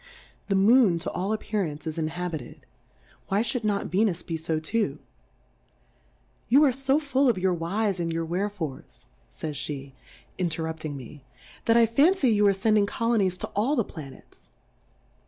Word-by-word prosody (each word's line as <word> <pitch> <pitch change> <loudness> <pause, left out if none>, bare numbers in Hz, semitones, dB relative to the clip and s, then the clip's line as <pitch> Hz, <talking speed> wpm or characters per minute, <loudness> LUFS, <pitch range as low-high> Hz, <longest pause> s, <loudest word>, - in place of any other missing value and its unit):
The 195 - +1
Moon, 205 -1 +5
to 165 - -4
all 190 +3 -2
Appearance, 195 -8 -2
is 160 0 -4
in 155 - 0
habited, 165 -5 -6 0.6
why 200 +3 +1
fhould 240 0 -1
not 205 -2 -1
J^enus 190 -2 +1
be 165 - -3
fo 160 0 -1
too 160 -3 -1
I - - -30 1.5
Yoo 275 +6 +6
are 275 -4 +4
fo 270 +2 +2
full 280 -3 +2
of 230 - +1
your 185 0 +1
Whys, 190 +4 -1
and 165 -1 -1
your 165 0 -2
Wherefores, 175 -4 -4 0.2
fays 145 - -5
(he 140 -2 -6
^ - - -33 0.4
inter 165 -3 -1
rupting 160 -2 -4
me, 135 +1 -10 0.4
that 230 0 +4
I 235 - +6
fancy 280 - +3
you 210 -1 +4
are 200 - +5
fend 215 +2 +3
ing 200 - +3
Colonies 210 -5 +1
to - - -3
all 235 +9 0
the 235 - +2
Planets. 145 -8 -12
190 Hz, 175 wpm, -26 LUFS, 160-225 Hz, 1.5 s, Yoo